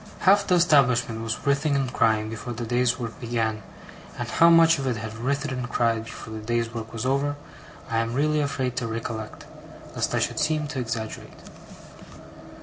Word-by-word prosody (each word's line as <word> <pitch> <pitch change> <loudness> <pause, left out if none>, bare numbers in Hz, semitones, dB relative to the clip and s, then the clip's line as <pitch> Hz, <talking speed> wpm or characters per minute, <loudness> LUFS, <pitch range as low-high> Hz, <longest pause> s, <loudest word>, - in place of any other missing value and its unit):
Half 200 +2 +5
the 180 - +4
establishment 125 -9 +3
was 115 -1 -4
writhing 140 +1 +2
and 135 -2 -1
crying, 110 -2 +2
before 115 +2 -6
the 120 +1 -5
day's 125 +1 +1
work 115 -3 -6
began; 115 -3 -1 0.6
and - - -3
how 170 - +5
much 165 -1 +6
of 135 - -2
it 125 -3 0
had 110 0 -6
writhed 140 +3 -1
and 125 -1 -4
cried 115 -2 +1
before 110 -1 -9
the 110 - -5
day's 115 +1 -2
work 115 -1 -6
was 115 +1 -4
over, 140 +2 +1 0.5
I 115 - 0
am 115 +1 -2
really 150 +2 +2
afraid 135 -3 -1
to 120 -3 -1
recollect, 115 -1 -5 0.5
lest - - -1
I - - +2
should - - -1
seem 155 -1 +1
to 145 -3 -4
exaggerate. 115 -2 -5
120 Hz, 185 wpm, -25 LUFS, 115-140 Hz, 0.6 s, much